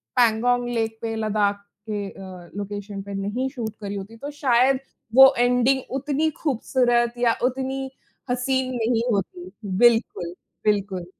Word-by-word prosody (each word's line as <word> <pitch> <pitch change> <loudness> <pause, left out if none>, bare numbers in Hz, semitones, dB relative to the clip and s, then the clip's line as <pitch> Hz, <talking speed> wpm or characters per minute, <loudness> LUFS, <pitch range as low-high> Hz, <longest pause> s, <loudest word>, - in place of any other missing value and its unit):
Pangong 245 +1 +3
lake 225 -2 -1
पे, 225 -1 -3
लद्दाख 205 -2 0 0.3
के 205 -1 -2
अ, 185 -3 -11
location 205 0 -5
पे 200 0 -8
नहीं 205 +7 -2
शूट 220 -3 -4
करी 200 0 -4
होती, 205 +4 -7
तो 285 +5 -6
शायद 260 -2 +3 0.4
वो 265 0 +9
एंडिंग 250 +2 +3
उतनी 295 +3 0
ख़ूबसूरत 240 -3 +1
या 235 -2 +3
उतनी 265 +1 -1 0.4
हसीन 255 +1 0
नहीं 230 0 +1
होती। 355 - -3 0.3
बिल्कुल, 225 -7 +3 0.3
बिल्कुल। 200 -4 0
235 Hz, 135 wpm, -24 LUFS, 205-260 Hz, 0.4 s, वो